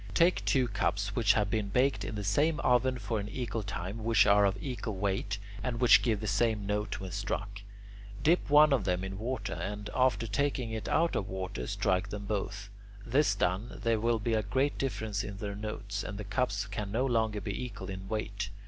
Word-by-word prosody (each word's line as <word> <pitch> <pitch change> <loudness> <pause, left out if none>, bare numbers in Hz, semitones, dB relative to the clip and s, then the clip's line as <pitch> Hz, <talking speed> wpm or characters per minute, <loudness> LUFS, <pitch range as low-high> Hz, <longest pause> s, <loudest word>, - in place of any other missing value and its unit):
Take 175 +2 +4
two 130 -3 +3
cups 100 -1 -1
which 110 -4 +4
have 105 -2 +1
been 110 -2 0
baked 130 +6 +2
in - - -4
the 105 - -3
same 145 +11 +2
oven 125 0 +3
for 110 -1 -2
an 100 +1 -5
equal 115 -1 -3
time, 100 +2 -5
which 115 0 +4
are 100 0 +5
of 100 0 +1
equal 120 -3 -4
weight, 100 +1 -1 0.2
and 115 0 -2
which 125 -2 +7
give 110 -4 0
the - - -4
same 105 0 +1
note 105 +1 -2
when 95 -1 -6
struck. 100 +1 -3 0.6
Dip 165 +1 +3
one 150 0 +7
of 135 - +2
them 90 +1 0
into 95 0 -5
water 125 +5 -3
and, 105 +1 -5
after 130 -2 +2
taking 125 +1 -1
it 110 -1 -4
out 170 0 +2
of 95 - -2
water, 95 -10 -4
strike 95 +1 0
them 105 0 -5
both. 100 0 -3 0.3
This 125 -3 +3
done, 95 +5 -1
there 115 -2 +2
will 115 +1 +2
be 115 +2 -1
a 110 - +2
great 130 +7 0
difference 110 -6 -2
in 100 -1 -6
their 100 0 -4
notes, 100 -1 -4
and 105 - -5
the 105 - -5
cups 105 -1 -1
can 100 0 -5
no 120 +5 +1
longer 110 -4 +1
be 125 - -4
equal 100 -6 -6
in 95 0 -7
weight. 105 -1 -3
105 Hz, 210 wpm, -31 LUFS, 100-120 Hz, 0.6 s, which